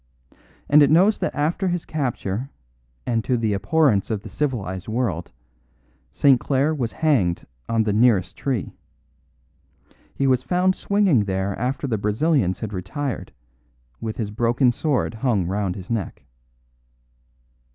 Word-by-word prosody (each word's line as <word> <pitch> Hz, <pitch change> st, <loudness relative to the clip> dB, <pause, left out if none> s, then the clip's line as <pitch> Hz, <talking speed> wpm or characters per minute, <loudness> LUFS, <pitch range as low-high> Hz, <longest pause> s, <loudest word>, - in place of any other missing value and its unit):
And 150 Hz, +1 st, +6 dB
it 145 Hz, -, +6 dB
knows 190 Hz, +7 st, +4 dB
that -, -, -2 dB
after 160 Hz, +7 st, 0 dB
his 175 Hz, -1 st, -2 dB
capture, 125 Hz, -5 st, -3 dB, 0.6 s
and 115 Hz, -2 st, 0 dB
to 125 Hz, +1 st, +1 dB
the 110 Hz, -3 st, 0 dB
abhorrence 125 Hz, -, +2 dB
of 110 Hz, -3 st, -2 dB
the -, -, -8 dB
civilised 100 Hz, -10 st, -3 dB
world, 110 Hz, -8 st, -2 dB, 0.8 s
St. 130 Hz, -, +4 dB
Clare 140 Hz, +3 st, +1 dB
was 125 Hz, -7 st, -2 dB
hanged 120 Hz, -, +1 dB, 0.2 s
on 115 Hz, -1 st, +2 dB
the 105 Hz, -2 st, 0 dB
nearest 105 Hz, -5 st, +3 dB
tree. 130 Hz, -8 st, -3 dB, 1.4 s
He 140 Hz, -, 0 dB
was 130 Hz, -2 st, +3 dB
found 180 Hz, +5 st, +1 dB
swinging 195 Hz, -, +2 dB
there 95 Hz, 0 st, -2 dB
after 130 Hz, +4 st, -2 dB
the 115 Hz, -6 st, -1 dB
Brazilians 105 Hz, -, +1 dB
had 110 Hz, -2 st, -4 dB
retired, 115 Hz, +9 st, -4 dB, 0.7 s
with 110 Hz, -1 st, -5 dB
his 105 Hz, -3 st, -3 dB
broken 120 Hz, +3 st, +2 dB
sword 140 Hz, 0 st, -1 dB
hung 110 Hz, -5 st, 0 dB
round 95 Hz, 0 st, -2 dB
his 95 Hz, +2 st, -8 dB
neck." 110 Hz, -5 st, -3 dB
120 Hz, 140 wpm, -23 LUFS, 100-145 Hz, 1.4 s, And